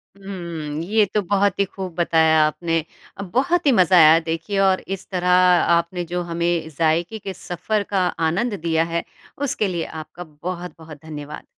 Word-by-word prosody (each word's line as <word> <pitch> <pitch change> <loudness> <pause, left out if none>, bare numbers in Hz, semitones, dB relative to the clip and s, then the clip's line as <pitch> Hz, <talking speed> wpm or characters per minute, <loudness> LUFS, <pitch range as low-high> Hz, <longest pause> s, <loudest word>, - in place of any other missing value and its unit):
हुँ, 170 -6 -6
ये 210 +3 +2
तो 210 - +2
बहुत 200 +1 +1
ही 200 - +3
खूब 190 -2 -7
बताया 160 -2 +3
आपने। 165 +1 -1 0.4
अ, 200 - -5
बहुत 275 - 0
ही 280 - +5
मज़ा 185 -4 +4
आया 160 0 +8
देखिए 165 +5 -3
और 190 0 +2
इस 195 0 -5
तरह 180 -1 -1
आपने 180 -1 +3
जो 180 - 0
हमें 170 -1 -1
ज़ायके 170 +6 0
के 195 -1 -6
सफ़र 195 +5 -3
का 190 -2 +2 0.2
आनंद 215 +7 -1
दिया 165 -1 +1
है, 170 - 0 0.3
उसके 270 -7 -1
लिए 175 -3 -2
आपका 160 +2 -9 0.2
बहुत-बहुत 175 -4 -7
धन्यवाद। 150 -1 -8
175 Hz, 165 wpm, -21 LUFS, 165-195 Hz, 0.4 s, आया